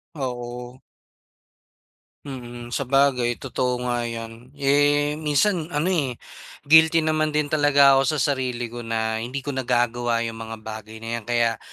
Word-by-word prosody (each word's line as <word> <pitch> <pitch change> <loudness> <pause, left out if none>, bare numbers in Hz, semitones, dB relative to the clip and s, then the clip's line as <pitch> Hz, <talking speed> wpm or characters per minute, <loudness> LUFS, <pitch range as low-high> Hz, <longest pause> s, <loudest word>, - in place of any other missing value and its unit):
Oo. 125 -2 -6 1.5
Mm, 120 -3 -8
sabagay 130 -2 +2
totoo 125 -1 -2
nga 120 -1 -1
'yan. 115 +1 -8
Eh, 145 +1 +2
minsan 155 +3 +1
ano, 165 +3 -1
eh, 140 -9 0 0.5
guilty 160 +2 +6
naman 155 -1 0
din 150 -1 0
talaga 140 -2 +5
ako 145 +3 +1
sa 145 0 +1
sarili 125 -3 -3
ko 120 - -7
na 110 -1 -2
hindi 130 +4 -5
ko 145 - -3
nagagawa 120 -2 0
yung 115 -1 -5
mga 115 0 -6
bagay 110 0 -9
na 115 +1 -3
'yan. - - -15
Kaya 120 -1 +1
125 Hz, 145 wpm, -23 LUFS, 120-145 Hz, 1.5 s, guilty